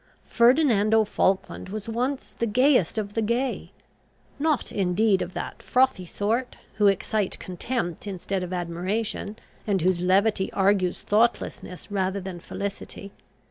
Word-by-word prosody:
Ferdinando 235 -4 +4
Falkland 190 -2 0
was 210 +1 -5
once 250 +4 -2
the 235 - -2
gayest 250 - +3
of 205 -2 -3
the 225 - 0
gay. 235 +4 -1 0.7
Not 305 -3 +1
indeed 195 +1 +2
of 180 0 -5
that - - -5
frothy 255 -8 +2
sort, 225 +8 -1 0.2
who 210 -1 +4
excite 200 +1 0
contempt 185 0 -4
instead 195 0 -3
of 180 0 -5
admiration, 185 +5 -3 0.3
and 195 -3 +1
whose 180 -1 +2
levity 190 +2 +2
argues 195 -2 +1
thoughtlessness 210 -3 0
rather 190 0 0
than 185 -2 -7
felicity. 200 +2 -6
205 Hz, 130 wpm, -25 LUFS, 185-230 Hz, 0.7 s, Ferdinando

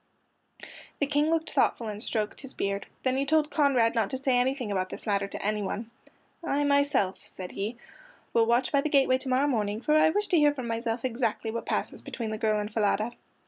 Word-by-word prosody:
The 285 - +1
King 295 +2 +1
looked 320 -1 0
thoughtful 250 -4 +1
and 210 0 -5
stroked 215 -2 -2
his 270 -2 -10
beard. 200 0 -2 0.2
Then 260 0 +1
he 275 - +1
told 300 +1 +2
Conrad 265 -6 +3
not 225 -4 +1
to 260 - -2
say 265 -1 +1
anything 250 -2 0
about 185 -1 -1
this - - -8
matter 200 -2 0
to 200 - -7
anyone. 210 +2 -2 0.5
"I 290 -3 0
myself," 285 -9 +2
said 185 -1 -9
he, 215 +4 -4 0.6
"will 225 -1 +4
watch 240 +2 +2
by 280 - +3
the 310 - -1
gateway 270 -3 +4
to 260 - -6
morrow 260 +2 +3
morning, 215 -6 0
for 300 +5 +1
I 310 - +6
wish 415 +5 0
to 350 - +4
hear 295 -1 +4
for 260 - -5
myself 230 +1 -2
exactly 230 -2 -1
what 230 - -5
passes - - -2
between 225 -3 -5
the 215 - -4
girl 215 -1 +2
and 210 +1 -4
Falada." 215 +1 +1
240 Hz, 215 wpm, -28 LUFS, 215-280 Hz, 0.6 s, I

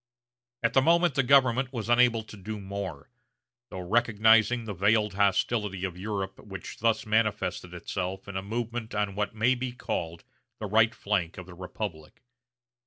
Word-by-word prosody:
At 115 - +2
the 135 - +5
moment 170 +2 +4
the 140 - +3
government 130 -1 +4
was 115 -5 -4
unable 120 -1 +4
to 110 - -12
do 105 +2 -6
more, 95 -7 -6 0.6
though 95 - -6
recognizing 115 +3 +3
the 105 - -4
veiled 105 +2 +2
hostility 100 0 +1
of 90 -2 -5
Europe 95 0 -4
which 95 -3 -9
thus 110 -1 +1
manifested 110 -5 0
itself 95 +2 -4
in 100 - -7
a 95 - -1
movement 115 +2 -4
on 105 -1 0
what 105 +2 -2
may 115 +4 +3
be 125 0 -4
called 85 -8 -4 0.3
the 110 - -5
right 110 +2 +3
flank 90 -5 -1
of 90 - -7
the 90 - -12
republic. 90 -1 -7
105 Hz, 165 wpm, -28 LUFS, 95-115 Hz, 0.6 s, the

